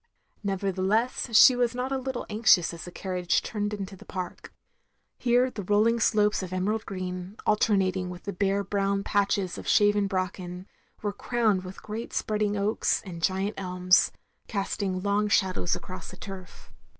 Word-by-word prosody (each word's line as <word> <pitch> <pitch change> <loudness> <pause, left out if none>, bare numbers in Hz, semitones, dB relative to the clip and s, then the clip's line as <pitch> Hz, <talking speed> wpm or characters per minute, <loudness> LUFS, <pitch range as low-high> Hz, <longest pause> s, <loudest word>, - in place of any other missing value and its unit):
" - - -41
Nevertheless 200 +5 0
she 255 +1 +9
was 245 -1 +1
not 250 +2 -2
a 270 - +1
little 260 -1 -4
anxious 210 -5 +4
as 170 - -8
the 175 - -8
carriage 180 -1 -1
turned 205 -2 -2
into 200 -2 -5
the - - -14
park. 185 -1 -6 0.7
Here 250 +1 +3
the 210 - -5
rolling 210 +4 +3
slopes 210 -2 +2
of 185 -1 -6
emerald 205 +4 -1
green, 185 +1 -5
alter 210 0 +3
nating 185 -1 0
with 180 0 -9
bare 200 0 +2
brown 200 0 0
patches 200 -3 0
of - - -9
shaven 205 -1 +4
bracken, 185 -1 -3 0.2
— - - -35
^were 205 -1 -2
crowned 220 -6 +1
with 185 +1 -10
great 220 +2 -6
spreading 210 -1 0
oaks, 205 +2 +1
and 170 -3 -7
giant 190 +4 0
elms, 180 -1 +3 0.4
casting 195 -2 -2
long 205 +1 +1
shadows 190 -4 +1
across 185 -3 -8
the 185 - -11
turf. 190 -3 -10
200 Hz, 165 wpm, -27 LUFS, 185-215 Hz, 0.7 s, she